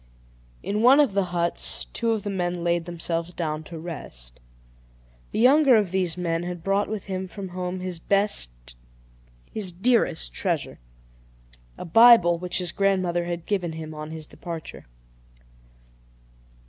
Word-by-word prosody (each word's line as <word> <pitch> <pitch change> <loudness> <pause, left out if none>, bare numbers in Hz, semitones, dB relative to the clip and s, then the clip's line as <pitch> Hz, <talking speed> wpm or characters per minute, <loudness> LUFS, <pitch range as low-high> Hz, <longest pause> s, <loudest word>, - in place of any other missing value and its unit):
In 210 +2 -1
one 260 +5 +7
of 285 -8 +4
the 200 -1 +1
huts, 170 -1 -1
two 230 - -1
of 220 -3 -1
the 205 - -3
men 175 -2 -2
laid 170 -1 0
themselves 170 0 -3
down 155 -2 -3
to 170 - -8
rest. - - -9 0.9
The - - -4
younger 265 +3 +6
of 205 -5 +2
these 185 -3 -1
men 165 -2 -1
had 175 -1 -6
brought 195 +2 +1
with 215 -2 -4
him 190 -1 -4
from 190 +1 -7
home 180 0 -4
his 180 -2 -5
best, - - 0 0.8
his 200 -4 -3
dearest 180 - +1
treasure - - -2 1.0
a - - -7
Bible, 180 -3 +7
which 180 0 -3
his 180 -3 -1
grandmother 185 -3 +1
had 170 -1 -4
given 180 -5 -1
him 160 -1 -7
on 155 0 -7
his 160 -1 -6
departure. 165 - -8
180 Hz, 145 wpm, -25 LUFS, 165-200 Hz, 1.0 s, one